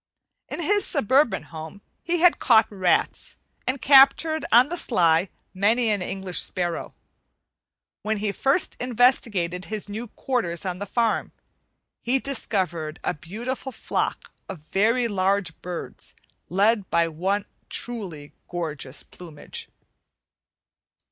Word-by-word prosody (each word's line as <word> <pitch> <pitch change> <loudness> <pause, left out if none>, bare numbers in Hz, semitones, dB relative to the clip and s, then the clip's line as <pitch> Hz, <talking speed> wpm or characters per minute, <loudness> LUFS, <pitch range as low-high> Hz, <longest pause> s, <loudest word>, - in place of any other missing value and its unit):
In - - -4
his 410 +5 +2
suburban 265 - +2
home 160 +5 -10 0.2
he 345 0 -1
had 355 -1 +5
caught 225 -3 +5
rats 185 -3 0 0.3
and 265 +2 0
captured 280 +4 +6
on 245 +5 +6
the 350 - -2
sly 175 - +2 0.2
many 220 +5 +2
an 205 -2 0
English 190 0 -1
sparrow. 175 -2 -2 1.1
When 215 0 -1
he 205 0 -1
first 270 - +1
investigated 225 -8 +1
his 215 -1 -4
new 220 +4 -5
quarters 205 -8 -2
on 180 -1 -3
the 205 - -5
farm, 230 +2 0 0.7
he 250 +3 +1
discovered 185 - -2
a - - 0
beautiful 235 - -6
flock 230 - -3 0.2
of 190 -5 -7
very 225 +9 +1
large 195 -4 0
birds 175 -1 -7 0.3
led 200 +3 +2
by 170 0 +2
one 185 +6 -1
of 200 - -31
truly 185 -12 -4
gorgeous 150 -6 -4
plumage. 165 -4 -9
205 Hz, 120 wpm, -24 LUFS, 175-245 Hz, 1.1 s, captured